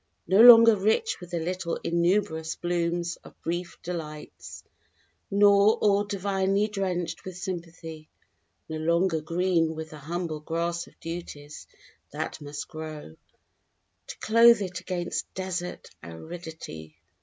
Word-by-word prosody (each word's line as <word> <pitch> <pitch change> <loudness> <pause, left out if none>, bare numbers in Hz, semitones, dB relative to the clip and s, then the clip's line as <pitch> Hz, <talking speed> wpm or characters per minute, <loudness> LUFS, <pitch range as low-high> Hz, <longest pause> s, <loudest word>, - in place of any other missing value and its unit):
No 195 +3 +5
longer 230 -2 +10
rich 220 - +1
with 180 - -10
the 175 -1 -2
little 175 +1 -3
innumerous 170 -2 0
blooms 175 0 -1
of - - -17
brief 175 +1 -4
delights, 155 -4 -7 0.7
Nor 200 +1 +5
all 205 -1 +2
divinely 195 0 0
drenched 180 -5 -3
with 185 -1 -8
sympathy. 165 -4 -7 0.6
No 160 - -4
longer 170 +1 +1
green 165 0 +1
with 160 0 -7
the 155 - -10
humble 165 +1 -4
grass 170 +2 -3
of - - -21
duties 155 -3 -8 0.4
that - - -5
must 145 0 -6
grow, 155 - -8 0.9
To - - -8
clothe 230 -1 +5
it 185 -2 -5
against 175 -2 -4
desert 185 -1 -5
aridity. 85 - -9
175 Hz, 120 wpm, -27 LUFS, 160-190 Hz, 0.9 s, longer